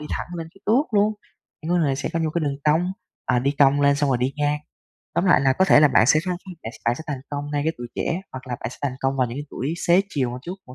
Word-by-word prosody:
đi 150 - -7
thẳng - - -3
lên 165 -1 -6
cái 195 - -20
tuốt 250 +8 +4
luôn. 210 +1 +3 0.5
Nhưng 165 - -4
có - - +3
người 140 -5 +1
sẽ 140 - -3
có 165 - 0
những 160 -1 0
cái 170 - +1
đường 140 -1 -1
cong, 165 +5 +2 0.3
à, 125 - +2
đi 135 +3 +1
cong 140 0 +5
lên 140 0 +4
xong 145 -1 +1
rồi 125 - +2
đi 130 +2 0
ngang. 150 0 +1 0.6
Tóm 180 - +1
lại 180 - +5
là 135 -1 +3
có 185 - +3
thể 170 - +6
là 150 - +7
bạn 115 -4 +4
sẽ 155 +3 +5
khăng 180 -1 -1 0.3
bạn 110 - -5
bạn 120 +1 +2
sẽ 160 - -8
thành 140 -4 -4
công 145 0 -4
ngay 145 -1 0
cái 160 - +1
tuổi 120 - -5
trẻ, 170 +3 -1
hoặc 130 0 -8
là 120 - -3
bạn - - -4
sẽ - - -11
thành 135 -3 -1
công 135 0 0
vào 130 -2 +2
những 120 +3 -6
cái 145 - -4
tuổi 145 +6 -3
xế 175 +2 +6
chiều 130 -8 -1
một 125 - -6
chút, 175 +3 -5
hoặc 125 - -11
145 Hz, 315 wpm, -23 LUFS, 130-165 Hz, 0.6 s, là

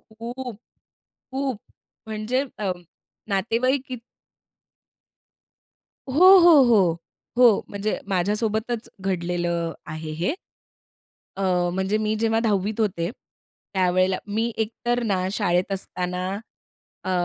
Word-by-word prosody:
खूप, 235 +1 -7 0.8
खूप 265 -4 -2 0.5
म्हणजे 220 +5 -1 0.2
अ, 200 -3 0 0.6
नातेवाईक 230 +7 +1
किती 250 -3 -6 2.1
हो, 370 +8 +8
हो, 335 -5 +8
हो, 200 -9 +4 0.4
हो. 235 -5 +6
म्हणजे 205 +1 -2
माझ्यासोबतच 215 +4 -1
घडलेलं 175 -2 -1 0.2
आहे 155 0 -6
हे. 170 - -1 1.0
अ, - - -3 0.3
म्हणजे 190 +3 0
मी 215 0 0
जेव्हा 225 0 +2
10 210 -1 0
होते 180 -6 0 0.6
त्यावेळेला 185 0 +2
मी 225 +3 -1
एकतर 240 +2 -1
ना 190 -4 0
शाळेत 185 -3 +1
असताना 180 -1 -3 0.7
अ, - - -4
210 Hz, 95 wpm, -24 LUFS, 185-235 Hz, 2.1 s, हो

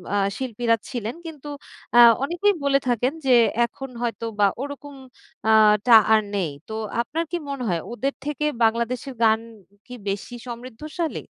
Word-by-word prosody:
আ - - +2 0.2
শিল্পীরা 240 -2 0
ছিলেন। 235 -2 -4
কিন্তু 300 -3 -9 0.5
আ - - +9 0.2
অনেকেই 350 +8 +1
বলে 275 -1 +3
থাকেন 245 +3 +1
যে 260 - +4 0.3
এখন 270 +3 -9
হয়তো 235 -1 -3
বা 205 - +6
ওরকম 285 0 -7 0.5
আ - - +6 0.4
টা 235 - +8 0.2
আর 220 - +5
নেই। 180 -6 -1 0.2
তো - - -5 0.3
আপনার 315 +8 -3
কি 350 - -1
মনে 275 -2 -4
হয় 170 -2 0
ওদের 270 +4 -2
থেকে 295 0 -2 0.2
বাংলাদেশের 235 +4 0
গান 220 0 +4 0.5
কি 250 - -11 0.2
বেশি 200 +5 -4
সমৃদ্ধশালী? 255 +8 -5
250 Hz, 155 wpm, -23 LUFS, 230-285 Hz, 0.5 s, আ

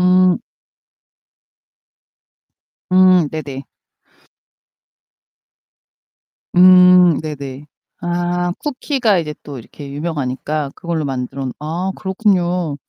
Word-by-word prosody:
음. 180 0 +4 2.6
음 185 -3 +5
네네. 140 -4 -6 2.9
음, 180 -2 +6
네네. 145 -2 -7 0.4
아 175 0 -1
쿠키가 260 -7 0
이제 155 -2 -4
또 140 -3 -8
이렇게 140 +4 -11
유명하니까 145 -1 -3
그걸로 165 -3 -3
만들어 135 0 -4
놓 130 - -3
아 170 +5 -3
그렇군요. 180 -5 0
170 Hz, 160 characters per minute, -18 LUFS, 145-180 Hz, 2.9 s, 음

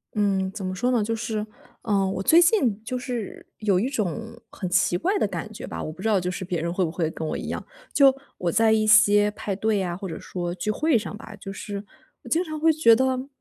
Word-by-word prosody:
嗯， 195 -2 +1
怎 195 -2 -6
么 185 - -2
说 245 +7 0
呢， 235 -4 +2
就 225 +2 -1
是， 220 -1 -3 0.4
嗯， 200 -4 +1
我 190 - -3
最 330 - +6
近 295 - +3
就 250 +2 -3
是 245 -5 -5
有 200 -4 +2
一 245 - 0
种 225 - -3
很 185 - -5
奇 180 0 +2
怪 390 - 0
的 - - +2
感 - - -5
觉 - - -8
吧， - - -5
我 - - -4
不 175 - -11
知 220 - -1
道 210 -3 +3
就 180 0 -2
是 185 - -5
别 175 -3 -2
人 170 +1 -2
会 185 - +1
不 160 - -3
会 165 -2 -1
跟 160 - -5
我 - - -2
一 - - -6
样。 - - -4 0.3
就 275 -2 +6 0.2
我 175 -1 -1
在 225 +5 +4
一 215 -1 +2
些 210 -1 +6
派 205 -1 -4
对 215 +1 +1
呀， 180 -2 -2
或 195 - -6
者 160 - -6
说 175 -1 -4
聚 185 +4 -1
会 300 +4 +2
上 210 -1 -5
吧， 215 0 -11
就 195 -1 -8
是 200 +1 -6 0.4
我 - - -10
经 335 +2 +2
常 310 -3 -6
会 325 +1 +5
觉 295 -7 +6
得 260 +2 0
210 Hz, 275 characters per minute, -25 LUFS, 185-235 Hz, 0.4 s, 最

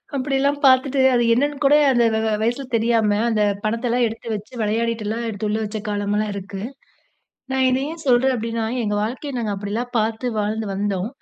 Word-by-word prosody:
அப்படிலாம் 275 +1 0
பார்த்துட்டு 265 +1 +4
அது 240 -1 +3
என்னன்னு 285 +4 0
கூட 285 - +6 0.2
அந்த 240 -2 +3
வ - - +1
வ 220 - +1
வயசுல 240 +5 0
தெரியாம 225 -2 +2
அந்த 215 -2 +1 0.2
பணத்தலாம் 235 +2 +1
எடுத்து 225 +1 -8
வச்சு 210 +4 -7
விளையாடிட்டுலாம் 225 +1 -1
எடுத்து 210 0 -3
உள்ள 215 - 0
வச்ச 215 +1 -4
காலம்லாம் 205 +1 -1
இருக்கு. 195 0 -6 0.9
நான் 265 0 +1
இத 255 +1 +2
ஏன் 325 0 -8
சொல்றேன் 255 +1 +4
அப்படின்னா, 230 -1 -2 0.2
எங்க 210 -1 -1
வாழ்க்கைய 265 +6 -4
நாங்க 215 -3 -2
அப்படிலாம் 210 +5 -4
பார்த்து 220 +3 -1
வாழ்ந்து 215 +1 -1
வந்தோம். 200 0 -1
230 Hz, 170 wpm, -21 LUFS, 210-255 Hz, 0.9 s, கூட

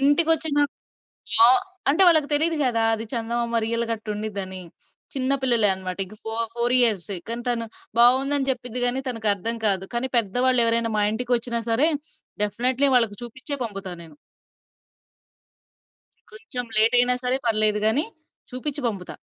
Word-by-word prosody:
ఇంటికొచ్చిన 310 +1 +2 0.9
ఆ! - - +7 0.4
అంటే 310 +7 +2
వాళ్ళకి 315 -4 +4
తెలీదు 320 +3 +1
గదా! 230 -3 0
అది 225 +1 -4
చందమామ 235 0 -2
రియల్‌గ 230 +1 -2
అట్టుండిద్దని, 210 -3 -6 0.5
చిన్న 265 0 -2
పిల్లలే 235 -5 +6
అన్నమాట. 185 -1 -6
ఇక 210 - -15
ఫో 220 - -5 0.2
ఫోర్ 240 +1 0
ఇయర్సే. 200 -6 +2
కానీ 235 +1 -4
తను 230 -1 -1 0.3
బావుందని 270 +3 +4
జెప్పిద్ది 250 -1 -3
గానీ 250 +2 +1
తనకర్థం 225 -1 -1
కాదు. 195 -1 +1
కానీ 245 +2 -2
పెద్దవాళ్ళెవరైనా 235 +1 +1
మా 210 - +1
ఇంటికొచ్చినా 235 0 -2
సరే, 240 +7 +3 0.6
డెఫినైట్లీ 255 +6 +1
వాళ్ళకి 225 -5 +1
చూపిచ్చే 260 +5 -5
పంపుతా 195 -4 -6
నేను. 155 -3 -16 2.2
కొంచెం 220 +3 -6
లేట్ 225 +3 +5
అయినా 245 +1 +3
సరే 250 +1 +1
పర్లేదు 215 -1 +2
గాని, 230 +8 +3 0.5
చూపిచ్చి 280 +3 -5
పంపుతా. 195 -5 -6
235 Hz, 130 wpm, -22 LUFS, 215-255 Hz, 2.2 s, ఆ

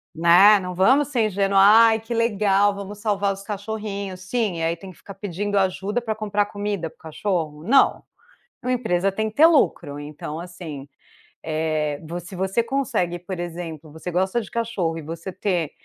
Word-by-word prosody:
Né, 180 +5 +7
não 180 -1 -6
vamos 260 +10 +4
ser 245 -6 +1
ingênuos, 195 -1 +2
ai 220 +2 +7
que 225 +2 -6
legal, 205 -3 +2
vamos 200 +1 -8
salvar 205 -2 0
os 195 - -10
cachorrinhos 200 -2 -5
sim, 210 -2 -1
e 165 - -3
aí 165 +1 +1
tem 185 +2 -11
que 180 - -19
ficar 200 - -11
pedindo 205 +1 -3
ajuda 195 +4 0
para 220 - -1
comprar 210 -1 -1
comida 205 -4 -3
para - - -14
o - - -55
cachorro. 160 -2 -3
Não. 270 +9 +4 0.6
Uma 250 - -1
empresa 195 -6 +1
tem 220 +3 -2
que 215 - -11
ter 315 +3 +8
lucro 170 - +2
então 150 +1 -7
assim, 170 -5 -8 0.5
eh, 155 -2 -1
vo 170 +2 -4
se 175 +2 -10
você 190 +5 0
consegue 230 -9 -1
por 180 +1 -7
exemplo, 165 -3 -6
você 160 +3 -7
gosta 190 +6 +1
de 210 - -8
cachorro 195 -9 -2
e - - -7
você 165 +4 -7
ter 180 -5 -1
195 Hz, 185 wpm, -23 LUFS, 170-215 Hz, 0.6 s, ter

